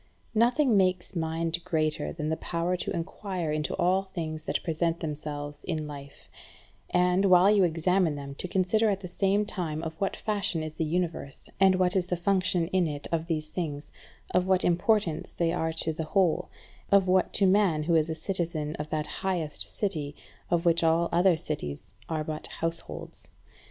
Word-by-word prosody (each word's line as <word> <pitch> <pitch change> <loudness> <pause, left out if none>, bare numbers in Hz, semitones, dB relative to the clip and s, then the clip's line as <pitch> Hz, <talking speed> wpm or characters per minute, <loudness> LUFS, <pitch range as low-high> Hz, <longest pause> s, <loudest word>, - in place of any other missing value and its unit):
Nothing 240 +3 +3
makes 185 0 +1
mind 165 +1 -1
greater 155 -2 -1
than 155 -2 -3
the 160 - 0
power 170 +1 -1
to 180 - -4
enquire 175 -1 -3
into 150 0 -1
all 185 +1 +2
things 165 -5 -6
that - - -1
present 165 0 0
themselves 145 -2 -5
in 155 -3 -2
life; 140 -1 -10 0.6
and, 180 +2 +3
while 185 +1 +6
you 205 -2 +5
examine 170 0 +2
them, 140 -1 -7
to - - -3
consider 195 +5 +2
at 195 -1 -1
the 185 - -6
same 195 +3 +1
time 165 -6 -4
of 160 +1 -6
what 195 - 0
fashion 200 -6 -1
is 155 -1 -5
the 160 - -2
Universe, 165 -4 -3
and 190 -1 +6
what 185 0 +2
is 180 -2 +1
the 180 - -1
function 185 -1 +1
in 185 -3 +2
it 145 -2 -4
of 165 -1 -1
these 155 -2 -2
things, 155 -4 -4 0.4
of 180 0 +2
what 190 -1 +3
importance 175 -1 +1
they 170 -1 0
are 160 -2 0
to 160 0 0
the 160 0 -4
whole, 180 0 +1 0.4
of 200 -1 +5
what 185 0 +3
to 200 - +5
man 185 -5 +3
who 170 +2 +1
is 160 -1 +3
a 160 - -2
citizen 160 -3 -1
of 150 +1 -5
that 155 -1 -1
highest 170 -6 -3
city 155 -8 -2 0.3
of 175 0 +1
which 170 0 +4
all 165 +1 +3
other 175 0 +4
cities 150 - -5 0.2
are 155 -2 -1
but 155 0 -5
households. 165 0 -5
170 Hz, 180 wpm, -28 LUFS, 155-185 Hz, 0.6 s, while